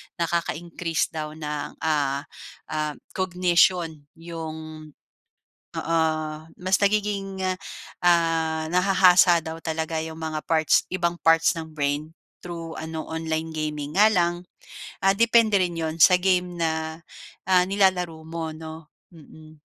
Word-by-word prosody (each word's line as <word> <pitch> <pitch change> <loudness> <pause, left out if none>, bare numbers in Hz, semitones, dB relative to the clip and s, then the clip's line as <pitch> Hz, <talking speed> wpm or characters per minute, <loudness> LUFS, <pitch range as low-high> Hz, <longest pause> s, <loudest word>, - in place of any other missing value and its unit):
nakaka-increase 170 0 -2
daw 155 -1 -5
ng, 150 -2 -5
ah 145 -3 0 0.5
ah, 155 -1 -2 0.2
cognition 175 -4 +1
yung 160 -2 -8 0.9
oo, 165 +1 0 0.6
mas 185 +1 +2
nagiging, 200 -2 0 0.6
ah, 165 -2 +2
nahahasa 180 0 +5
daw 160 +1 -6
talaga 160 0 -2
yung 160 0 -7
mga 155 -1 -4
parts 160 -2 +3
ibang 175 -2 0
parts 165 0 +4
ng 160 -1 -6
brain 150 0 -2 0.3
through 165 -2 -7
ano, 160 0 -5
online 160 0 -3
gaming. 150 -1 -4
Nga 210 +2 +7
lang, 175 0 +2 0.7
ah, 195 0 +4
depende 230 -1 +4
rin 175 -2 -3
yun 160 -1 -2
sa 180 +3 +7
game 180 -1 0
na, 160 0 -2 0.5
ah, 185 -1 +5
nilalaro 185 -4 +1
mo 165 -1 -4
'no? 160 0 -9 0.2
Mm. 155 -1 -16
165 Hz, 120 wpm, -24 LUFS, 160-180 Hz, 0.9 s, Nga